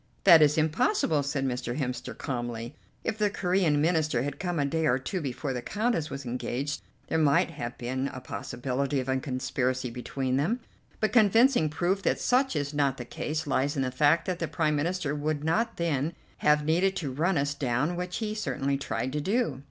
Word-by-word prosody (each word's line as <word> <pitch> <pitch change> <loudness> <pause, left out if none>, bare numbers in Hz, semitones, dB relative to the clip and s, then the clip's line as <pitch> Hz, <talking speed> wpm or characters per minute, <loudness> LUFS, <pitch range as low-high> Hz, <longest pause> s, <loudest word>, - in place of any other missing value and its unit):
"That 170 -5 +9
is 150 0 +5
impossible," 160 - +2
said 140 -1 -1
Mr. 125 -1 -2
Hemster 125 -4 -4
calmly. 120 -1 -4 0.3
"If 220 - -2
the 210 -1 +3
Corean 180 -6 +1
Minister 155 -5 +2
had 145 0 -4
come 175 -2 -2
a 145 - +2
day 160 +2 0
or 125 - +3
two 180 +8 -3
before 135 0 -3
the 125 - -3
Countess 210 - -1
was 135 -1 -6
engaged, 125 +3 -3 0.3
there 160 - 0
might 145 -2 +3
have 120 0 -6
been 130 +2 -2
a 130 - -6
possibility 130 +2 -2
of 130 - -4
a 130 0 +1
conspiracy 130 -1 -1
between 130 +2 -2
them; 200 - +1 0.4
but 215 -2 0
convincing 225 - +5
proof 175 +6 0
that - - +1
such 260 -1 +2
is 145 0 -2
not 140 -2 +1
the 120 - -6
case 155 +5 -3
lies 140 0 0
in 135 - +1
the 130 - -1
fact 145 +5 +3
that 185 -2 -2
the 165 - -1
Prime 150 0 0
Minister 160 0 -1
would 150 0 -2
not 225 +9 0
then 160 -2 0 0.3
have 150 0 +3
needed 180 +5 +2
to 145 -6 -3
run 165 +7 +1
us 140 +1 0
down, 140 +4 0
which 180 0 -3
he 215 -2 -2
certainly 140 -8 -1
tried 130 -1 -3
to 150 - -1
do." 195 - 0
145 Hz, 200 wpm, -28 LUFS, 130-175 Hz, 0.4 s, That